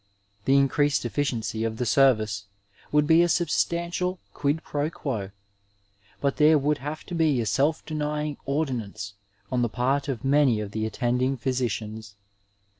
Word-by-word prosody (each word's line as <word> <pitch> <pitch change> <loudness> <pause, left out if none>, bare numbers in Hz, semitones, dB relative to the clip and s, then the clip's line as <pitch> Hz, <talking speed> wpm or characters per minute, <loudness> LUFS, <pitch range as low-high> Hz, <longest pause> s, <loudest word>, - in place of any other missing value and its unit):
The 135 +1 +5
increased 140 0 +2
effi 120 +5 -1
ciency 110 -5 -2
of 110 0 -5
the 125 - -1
service 110 -6 +3 0.5
would 150 0 +4
be 160 +2 +6
a 175 - +3
substantial 170 +2 0 0.2
quid 145 +2 -1
pro 145 +1 -2
juo, 115 - -4 0.9
but 140 -1 0
there 155 +1 +6
would 150 +1 0
have 150 +4 -5
to - - -9
be 160 -6 +2
a 115 - 0
self 145 +9 +1
denying 150 -1 -2
ordinance 115 -9 -2 0.4
on 125 -1 +1
the 120 - +1
part 135 +5 0
of 135 -3 -3
many 135 -5 +4
of 105 -1 -5
the 110 0 -2
attending 125 +4 0
physicians. 110 -5 -3
135 Hz, 155 wpm, -26 LUFS, 115-150 Hz, 0.9 s, be